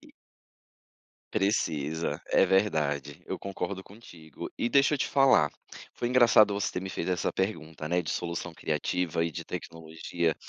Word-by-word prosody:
e - - -17 1.2
Precisa, 80 -6 0
é - - +4
verdade, 75 -7 0
eu - - -4
concordo 95 0 -5
contigo 85 -8 -11
e 120 - +1
deixa 140 +3 +4
eu - - -2
te - - 0
falar, 135 - +5 0.5
foi 120 - -2
engraçado 115 -4 +6
você 100 0 -1
ter 90 - -2
me 95 - -5
fez 85 - -3
essa 90 -1 0
pergunta, 80 -6 -3
né, 90 +1 +1
de 80 - -4
solução 85 0 -3
criativa 85 +2 -1
e 85 - -1
de - - -6
tecnologia 80 0 -3
90 Hz, 155 wpm, -28 LUFS, 80-100 Hz, 1.2 s, engraçado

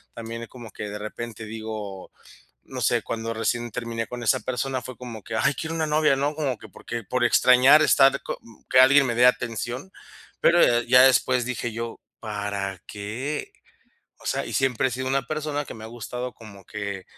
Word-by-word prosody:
También, 115 0 -6
eh, - - -8
como 120 -5 -11
que, 105 - -6
de 105 - -5
repente, 110 +1 -7
digo, 110 -3 -7 0.5
no - - -7
sé, - - +2
cuando 115 0 -4
recién 120 +1 -1
terminé 115 -2 -3
con 120 -1 -7
esa 125 +3 +3
persona, 130 0 -2
fue 130 - -8
como 115 -4 -8
que: 115 - -7
"Ay, 140 +6 +2
quiero 165 0 -4
una 160 -1 0
novia", 150 -1 +3
¿no? 145 +2 0
Como 135 -7 -2
que - - -12
porque 120 0 -7
por 125 +1 0
extrañar 130 +5 +6
estar 135 -2 +5
co - - -4
mm, 115 -2 -19
que 130 - +5
alguien 135 +1 +7
me 120 - -1
dé 125 - +6
atención. 125 - -1 0.5
Pero, 170 +1 +5
eh, 120 0 +3
ya 125 +1 +8
después 130 -1 +4
dije 120 -2 -3
yo: 115 0 -5 0.2
"¿Para 100 -3 -4
qué?". 115 +9 -5 0.7
O - - -12
sea, - - -1
y - - -6
siempre 130 -1 +2
he - - -7
sido 130 +2 -4
una 135 -1 0
persona 150 -1 -2
que - - -8
me 110 0 -10
ha - - -6
gustado 120 +2 -6
como 100 -4 -13
que 100 -2 -5
120 Hz, 205 wpm, -25 LUFS, 110-130 Hz, 0.7 s, ya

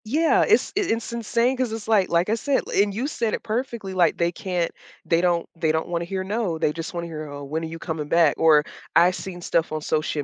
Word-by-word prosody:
Yeah, 310 +9 +3
it's - - +3
in 405 -2 0
it's 230 +1 -7
insane 235 +2 +1
'cause 255 -3 -1
it's 225 -1 -6
like, 210 -4 +3
like 170 +3 +2
I - - +2
said, 265 +4 +1
and 205 +1 +3
you 225 +7 -3
said 235 -7 -1
it - - -9
perfectly, 230 -3 -3
like 175 -3 +3
they 170 0 +1
can't 180 -1 -2 0.3
they 165 0 +2
don't 175 -1 +1
they 160 -1 +1
don't 160 +1 -2
wanna 170 -1 -2
hear, 190 +1 -3
"No," 195 -4 -2
they 155 -2 0
just 165 +1 -5
wanna 170 0 -3
hear, 155 -2 -6
"Oh, 145 0 -7
when 155 +4 -3
are - - -3
you 165 +1 -7
coming 160 -3 -4
back." 165 -1 +4
Or 155 -2 +6 0.3
I've 180 +1 +6
seen 180 -2 -7
stuff 170 -1 0
on 155 0 -3
social 155 -1 -1
175 Hz, 245 wpm, -24 LUFS, 160-220 Hz, 0.3 s, Or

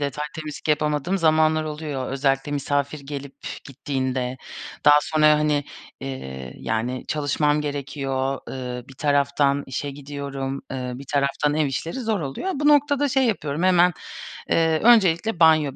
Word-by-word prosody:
detaylı 145 +1 -3
temizlik 155 -1 -7
yapamadığım 150 +5 +1
zamanlar 155 -1 +3
oluyor, 150 -4 -4
özellikle 135 +1 0
misafir 145 +1 -1
gelip 140 -1 -7 0.3
gittiğinde. 130 -2 -3 0.5
Daha 145 0 +8
sonra, 155 -1 +2
hani, 150 -1 +1 0.4
eee, 65 -1 -6
yani, 120 +3 -2
çalışmam 150 0 +1
gerekiyor, 135 -2 -2
ııı, 125 -2 -5
bir 135 - -12
taraftan 140 0 +2
işe 140 +2 -4
gidiyorum, 140 -1 -5
ııı, 125 -1 -4
bir 140 - -10
taraftan 145 +1 +1
ev 155 -1 +2
işleri 150 - -3
zor 220 -6 -1
oluyor. 140 - -3
Bu 295 +1 +1
noktada 290 -1 +4
şey 265 +1 +2
yapıyorum 155 -7 -1
hemen, 180 -1 +5 0.6
eee, 160 -1 +3
öncelikle 210 -4 +4
banyo 155 -4 +5
145 Hz, 135 wpm, -23 LUFS, 135-155 Hz, 0.6 s, Daha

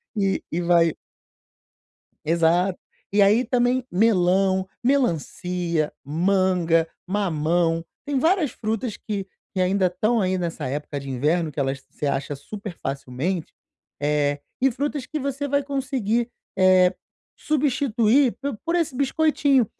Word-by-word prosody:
e 195 -2 0
e 170 - -1
vai 170 -2 +4 1.3
Exato. 170 +3 +2 0.3
E 205 - +4
aí 210 +6 +5
também 250 0 +1
melão, 190 -1 +3 0.2
melancia, 180 - 0
manga, 170 +1 +2 0.2
mamão, 165 -3 +1 0.2
tem 285 -2 -1
várias 325 -1 +2
frutas 220 0 -3
que 200 -3 -4 0.3
que 185 - 0
ainda 190 +1 +2
estão 215 +6 +1
aí 185 -2 +1
nessa 170 -6 -3
época 145 +1 -4
de 140 0 -8
inverno 155 +6 +1
que 150 - -15
elas 135 0 -2
você - - -5
acha 140 +1 -2
super 200 +5 -8
facilmente, 140 +6 -3 0.5
eh, 145 -1 +1 0.2
e 270 - +4
frutas 280 +2 -3
que 310 - -4
você 280 0 -2
vai 285 0 +1
conseguir, 255 -4 -1 0.3
eh, 185 -1 +5 0.4
substituir 265 -3 +2
por 280 -6 -3
por 335 - +1
esse 330 -6 0
biscoitinho. 280 -2 +2
190 Hz, 125 wpm, -23 LUFS, 165-250 Hz, 1.3 s, aí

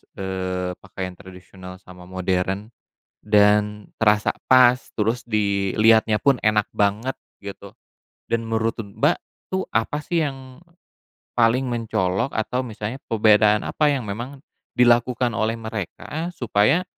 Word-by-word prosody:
eee, 95 -1 -3
pakaian 95 -1 -6
tradisional 90 0 -12
sama 90 -1 -14
modern? 95 +3 -2 0.5
Dan, 105 0 +2
terasa 105 -1 +3 0.2
pas 125 -1 +6 0.2
terus 115 +3 -1
diliatnya 105 +1 +3
pun 140 -2 +3
enak 105 -1 +1
banget" 105 +6 0 0.2
gitu, 100 +1 -9 0.6
dan 115 0 0
menurut 115 0 -1
Mbak, 100 -3 0 0.3
tuh 190 0 -1
apa 115 +6 0
sih 170 -2 0
yang 135 -1 -6 0.7
paling 120 +2 +3
mencolok? 115 -2 -1
Atau 125 +3 -1
misalnya 110 +2 -6
perbedaan 105 -1 +4
apa 150 - +1
yang 135 -4 -1
memang 120 +8 -5 0.4
dilakukan 120 0 +3
oleh 110 +1 0
mereka 110 - -5
supaya 120 - +2
110 Hz, 115 wpm, -22 LUFS, 100-120 Hz, 0.7 s, pas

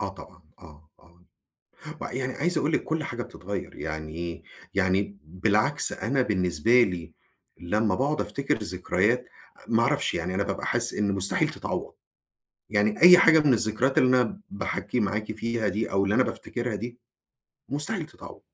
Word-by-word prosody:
آه - - -2
طبعًا - - -14 0.2
آه 80 0 -16
آه، 85 0 -24 0.8
و - - -4
يعني 130 +1 -2
عايز 175 +3 0
أقول 150 - 0
لِك - - 0
كل 160 -1 -2
حاجة 120 -2 -4
بتتغير 100 -2 -7
يعني 75 0 -5
إيه 85 0 -5 0.3
يعني 95 0 +2
ب 95 -3 -13
بالعكس 105 +8 +2
أنا 130 +4 0
بالنسبة 95 +2 +3
لي 85 -6 -3 0.5
لمّا 105 +3 0
باقعد 140 +7 0
أفتكر 140 -4 -1
الذكريات، 90 -3 0 0.4
ما - - +3
أعرفش - - +1
يعني 90 +2 -2
أنا 100 - +1
بابقى 100 0 -4
حاسس 120 -1 0
إن 100 -1 0
مستحيل 95 0 +1
تتعوّض - - -5 0.8
يعني 105 +3 +1
أي 180 +1 +11
حاجة 165 -4 +7
من 145 -4 +4
الذكريات 115 +4 +1
اللي 130 - +5
أنا 195 +9 -3
باحكّي 190 -9 -3
معاكِ 105 0 -1
فيها 115 0 -2
دي 105 +4 -2
أو 100 0 +2
اللي 100 +2 +1
أنا 130 - +5
بافتكرها 120 -3 -4
دي 120 +3 -7 0.7
مستحيل 150 +5 -1
تتعوض. - - -12
110 Hz, 165 wpm, -26 LUFS, 95-130 Hz, 0.8 s, أي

